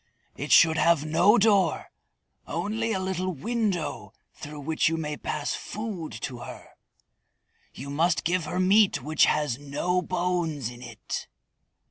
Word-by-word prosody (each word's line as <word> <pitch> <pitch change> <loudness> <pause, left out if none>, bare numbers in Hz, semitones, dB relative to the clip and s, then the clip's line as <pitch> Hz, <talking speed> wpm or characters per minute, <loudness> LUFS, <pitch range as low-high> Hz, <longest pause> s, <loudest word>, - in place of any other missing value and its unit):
It 145 +3 -5
should 160 -1 +6
have 165 -3 +3
no 175 +8 +4
door, 205 -3 +2 0.6
only 225 +2 -2
a 195 - 0
little 185 0 -2
window 210 - -2 0.2
through 150 0 -9
which 160 +2 +1
you 165 - -1
may 150 -2 -3
pass 150 0 -3
food 205 - -5
to 125 -2 -4
her. - - -10 1.0
You 140 +2 -8
must 165 +4 +1
give 175 0 0
her 180 +4 -3
meat 190 - +4
which 155 +3 +3
has 150 -5 0
no 150 +6 -1
bones 175 -8 -2
in 120 0 -12
it." 115 -3 -6
165 Hz, 140 wpm, -26 LUFS, 150-185 Hz, 1.0 s, should